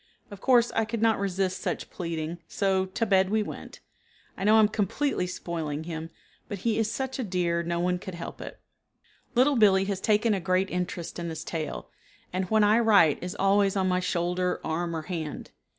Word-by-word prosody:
Of 200 - -10
course 240 -2 +4
I 225 - +1
could 230 0 -3
not 225 -2 +3
resist 190 -1 -1
such - - -3
pleading, 165 -1 -4
so 190 -1 0
to 190 +4 -1
bed 190 -2 +3
we 215 +1 +1
went. - - -9 0.5
I - - -6
know 210 +2 +5
I - - +7
am 215 - +6
completely 210 +1 -1
spoiling 160 -4 -4
him, 160 -1 -6 0.4
but 205 - -5
he 225 -1 +2
is 220 0 0
such 265 +1 -3
a - - 0
dear 175 -4 0
no 170 0 -2
one 180 +1 0
could 190 -1 -7
help 170 - -7
it. - - -8 0.8
Little 260 +3 +4
Billee 195 -3 +5
has 195 -1 -3
taken 215 +1 +3
a 195 - 0
great 185 +2 0
interest 180 -1 -4
in 170 -1 -3
this 160 -1 -5
tale, 160 -2 -5 0.4
and 185 +1 0
when 220 -1 +4
I 210 +2 +5
write 200 -10 +4
is 180 +2 -5
always 195 0 +3
on 190 -1 +1
my 180 0 +2
shoulder, 180 0 -1
arm 165 +1 -2
or 160 - -4
hand. 160 -3 -5
190 Hz, 200 wpm, -27 LUFS, 170-210 Hz, 0.8 s, I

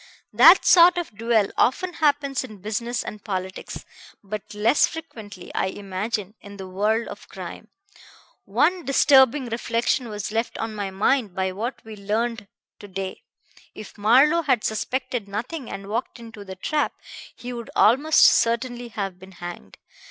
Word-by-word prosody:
That 315 - +7
sort 350 0 +7
of 340 -11 -4
duel 225 -2 +1
often 355 +8 +1
happens 285 -4 +1
in 215 -5 -10
business 235 +3 -2
and 210 -1 -8
politics, 190 -2 -5 0.4
but 205 +1 -7
less 225 +7 +3
frequently, 220 - -10
I - - 0
imagine, 200 +1 -4
in 200 0 -12
the 190 -1 -8
world 210 +5 0
of - - -10
crime. - - -9 0.8
One 360 -1 +1
disturbing 270 -1 +4
reflection 235 +1 -1
was 210 -1 -5
left 225 +2 -2
on 225 -1 -4
my 205 -2 -4
mind 205 +1 0
by 190 0 -1
what 225 +7 -5
we 220 -1 -9
learned 215 +2 -2 0.3
to 205 - -11
day. 190 -1 -6 0.5
If 215 - -10
Marlowe 265 +11 +4
had 260 -8 +1
suspected 250 0 -2
nothing 240 +7 -5
and 195 - -7
walked 220 +6 -4
into 225 -3 -11
the 190 -1 -9
trap, 295 +10 -1 0.4
he 245 +1 -7
would 235 -1 -7
almost 285 +8 +4
certainly 240 +1 +2
have 195 -5 -5
been 190 +1 -14
hanged. 175 0 -9
225 Hz, 150 wpm, -23 LUFS, 200-255 Hz, 0.8 s, That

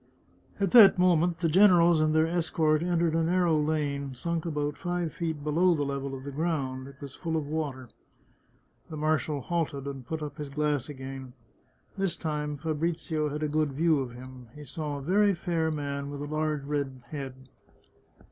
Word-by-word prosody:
At 195 -3 +1
that 210 -6 +9
moment 175 -1 +3
the 170 -1 0
generals 175 -2 +6
and 155 0 +3
their 160 0 +5
escort 160 -2 +1
entered 170 -2 +1
a 165 - +2
narrow 175 0 +2
lane, 145 -3 -1
sunk 170 +5 -2
about 150 -2 -2
five 175 -2 -3
feet 160 -4 -3
below 170 +4 +3
the 145 - -1
level 140 -1 -3
of 130 - -8
the 140 - -6
ground. 135 -4 -2
It 140 -1 -14
was 140 -2 -8
full 165 -2 -2
of 155 - -2
water. 145 -4 -3 1.0
The 155 - -6
marshal 155 -1 0
halted, 150 -3 -2
and 135 -2 -6
put 155 +5 -4
up 150 +1 -7
his 145 -1 -5
glass 150 -2 -1
again. 135 -2 -7 0.7
This 195 -3 +1
time 150 -2 -3
Fabrizio 160 0 -1
had 150 +1 -4
a - - +1
good 150 -1 0
view 160 +1 +3
of 125 -3 -4
him. 130 0 -11
He 150 - -9
saw 145 +1 -4
a 140 - -7
very 200 +5 +3
fair 170 -2 -1
man 140 -2 -3
with 145 0 -6
a 145 +1 -5
large 155 -2 -1
red 140 -3 -3
head. 135 -4 -5
150 Hz, 185 wpm, -28 LUFS, 140-165 Hz, 1.0 s, that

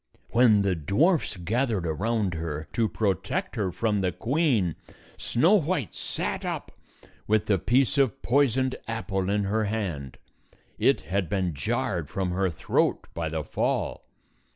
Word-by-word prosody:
When 115 -4 +5
the 100 -1 +2
dwarfs 105 - +1
gathered 110 +1 0
around 100 +4 0
her 80 -2 -4
to 115 -2 +1
pro 105 -3 +1
tect 85 - -4
her 95 -4 -1
from 105 +1 0
the 90 -1 +1
queen, 120 - +1 0.4
Snow 160 - +2
White 150 - -2
sat - - -3
up - - -4 0.6
with 110 0 +2
the 100 -3 +2
piece 130 - +2
of 135 -1 +2
poisoned 130 0 +2
apple 100 -4 -2
in 105 0 +1
her 105 +2 0
hand; 95 - -3 0.6
it - - +3
had 95 -2 -2
been 95 -3 0
jarred 95 - -2
from 95 -2 -2
her 95 +1 +1
throat 80 - 0
by 80 -1 -2
the 80 0 -3
fall. - - -2
105 Hz, 150 wpm, -26 LUFS, 90-120 Hz, 0.6 s, When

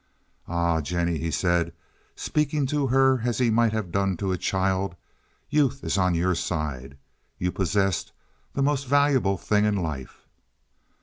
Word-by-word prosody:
"Ah, 85 -1 +1
Jennie," 85 +1 -1
he 85 - -2
said, 85 +1 +1 0.4
speaking 150 -1 0
to 140 +1 0
her 130 -1 +3
as 120 -3 0
he 120 -3 +2
might 115 0 +3
have 110 -5 -3
done 100 -1 0
to 95 0 -2
a - - +1
child, 95 -1 0 0.6
"youth 140 -2 +1
is - - -1
on 90 -2 +2
your 90 +2 +2
side. 70 -6 -3 0.4
You 90 0 -1
possess 95 -1 0 0.4
the 140 - +1
most 140 -1 0
valuable 140 -8 +3
thing 105 +2 +1
in 105 -1 +2
life." 80 -8 -5
95 Hz, 150 wpm, -25 LUFS, 85-130 Hz, 0.6 s, her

